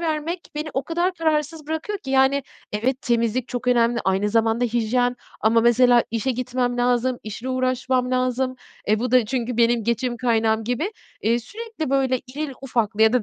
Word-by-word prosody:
vermek 325 +1 -2
beni 300 +1 -3
o 270 - 0
kadar 345 +3 0
kararsız 310 -1 -1
bırakıyor 320 +6 -3
ki 265 - -8
yani, 270 +1 +3 0.3
evet, 250 +5 -1
temizlik 235 +1 0
çok 250 0 -3
önemli, 235 -1 +3
aynı 190 +2 +1
zamanda 225 +2 +2
hijyen 245 +2 +1 0.2
ama 225 +1 +4
mesela 240 +1 +5
işe 230 +3 -1
gitmem 250 0 -1
lazım, 245 +1 +1
işle 220 +4 -6
uğraşmam 255 0 0
lazım, 255 0 0 0.3
e 215 0 +3
bu 250 +1 -2
da 250 -3 +5
çünkü 245 0 -2
benim 235 -1 +3
geçim 240 +1 -1
kaynağım 225 -2 +1
gibi. 245 - -2 0.3
Eee, 230 +2 +2
sürekli, 415 - -6
böyle, 265 -2 +2
irili 280 +2 -5
ufaklı 225 -5 0
ya 220 - +5
da 250 -2 +2
250 Hz, 170 wpm, -23 LUFS, 230-270 Hz, 0.3 s, mesela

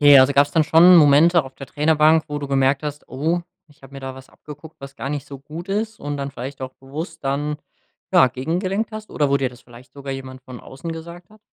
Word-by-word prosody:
Ja, 145 -2 +8
also 135 +2 +2
gab's 140 +1 +3
dann 160 +1 +2
schon 175 +4 +7
Momente 160 +2 +5
auf 135 0 -12
der 135 -2 -10
Trainerbank, 155 +1 +3
wo 145 0 -4
du 140 - -5
gemerkt 135 +1 +2
hast: 150 0 -6
„Oh, 160 +7 -1 0.3
ich 145 +1 -24
habe 135 0 -15
mir 135 - -8
da 130 0 -6
was 130 0 -13
abgeguckt, 150 +1 -13
was 140 0 -10
gar - - -5
nicht 145 0 -4
so 140 - -9
gut 160 +7 -9
ist“ 215 +2 -3
und 145 0 -4
dann 140 0 -5
vielleicht 135 +2 -7
auch 130 0 -6
bewusst 160 +5 -8
dann 145 +2 -2 0.6
ja, 130 - +7
gegengelenkt 180 - -2
hast 215 -1 -9
oder 145 -2 0
wo 140 - +4
dir 135 -2 0
das 125 0 -16
vielleicht 120 +1 -16
sogar 140 -1 -7
jemand 130 -1 -8
von 125 -1 -10
außen 140 +6 -8
gesagt 170 +3 -9
hat? 215 - -19
145 Hz, 240 wpm, -21 LUFS, 135-160 Hz, 0.6 s, Ja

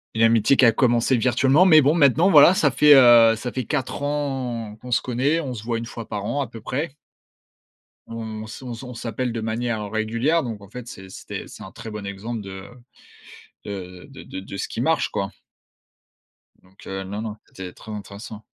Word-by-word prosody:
«une 110 - 0
amitié 115 +3 +4
qui - - +3
a 115 - +7
commencé 120 +1 +2
virtuellement», 130 +7 +3
mais 155 -5 +7
bon 145 +3 +3
maintenant, 160 +3 +4
voilà, 150 +4 +8
ça 150 -6 +2
fait, 150 +2 +6
heu, 120 -3 +7
ça 120 +3 -5
fait 130 0 -4
4 140 -2 -3
ans 130 -7 -3
qu'on 125 - -9
se - - +2
connaît, 135 +7 0
on 135 -5 -5
se 110 - -7
voit 115 -1 -1
1 115 - -5
fois 115 -1 -8
par 105 -2 -4
an, 140 - -2
à 140 - -1
peu 115 -1 -11
près. 140 +5 -4 1.1
On 110 -1 -6
se 110 +4 -10
on 125 -2 -6
s 115 - -9
on 125 -1 -8
s'appelle 120 +1 -3
de 115 - -3
manière 110 -1 -3
régulière 115 +9 0
donc 110 -4 -6
en 100 - -14
fait, 125 +2 -9
c'est 95 -3 -10
c'était - - -8
c'est - - -11
un - - -10
très 115 - -9
bon 105 -2 -7
exemple 105 +4 -5
de 95 -1 -9 1.0
de 90 -3 -8
de 135 -1 -12
de - - -8
de 100 +1 -8
ce - - -3
qui - - -5
marche - - +1
quoi. - - -3 1.3
Donc, 95 +1 -18
heu, 95 0 -4
non, 100 +3 -5
non, 110 -1 -6
c'était 90 -2 -9
très 110 - -11
intéressant. 105 +1 -8
115 Hz, 210 wpm, -23 LUFS, 105-130 Hz, 1.3 s, voilà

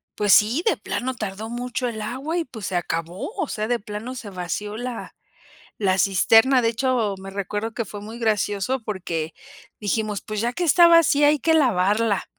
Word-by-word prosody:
pues 205 -1 +3
sí, 230 +10 +4
de 445 - +2
plano 255 +1 -3
tardó 215 0 -5
mucho 245 +1 -3
el 220 -2 -5
agua, 265 +10 -3
y 335 - -1
pues 225 -6 -7
se 190 - -3
acabó. 175 - -3
O 370 - -1
sea, 215 -3 -3
de 240 -1 0
plano 215 +5 -7
se 225 -4 -7
vació 200 +3 -4
la 245 -1 -6 0.6
la 190 -2 +1
cisterna. 225 +7 +4
De 230 - +3
hecho, 230 -3 0
me 195 0 -8
recuerdo 205 +3 -3
que 230 - -2
fue 205 +1 -8
muy 220 +3 -9
gracioso, 215 +2 0
porque 170 -6 -4 0.5
dijimos: 210 0 -1
"Pues 215 -1 -5
ya 240 +1 0
que 355 - -4
está 340 +2 +6
vacía, 305 -4 +5
hay 300 - +3
que 325 - +2
lavarla". 215 - +2
220 Hz, 190 wpm, -23 LUFS, 200-255 Hz, 0.6 s, está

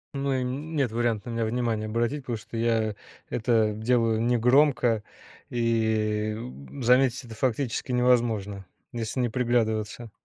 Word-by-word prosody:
Ну 140 0 -1
и 130 - 0
н 145 +6 -4
нет 130 -5 +1
варианта 120 -1 -1
на - - -4
меня 115 -1 0
внимание 115 -2 -1
обратить, 120 +6 -1
потому 120 -3 -3
что 110 - -11
я 115 -2 +1 0.3
это 110 -2 +2
делаю 115 0 +1
негромко, 120 -1 +3 0.5
и 110 -2 0
б 70 - -9
заметить 125 +1 +3
это 115 -1 -10
фактически 130 +1 -1
невозможно, 115 -6 +1 0.3
если 115 +2 -3
не 125 - +2
приглядываться. 115 -2 -1
115 Hz, 140 wpm, -26 LUFS, 110-125 Hz, 0.5 s, негромко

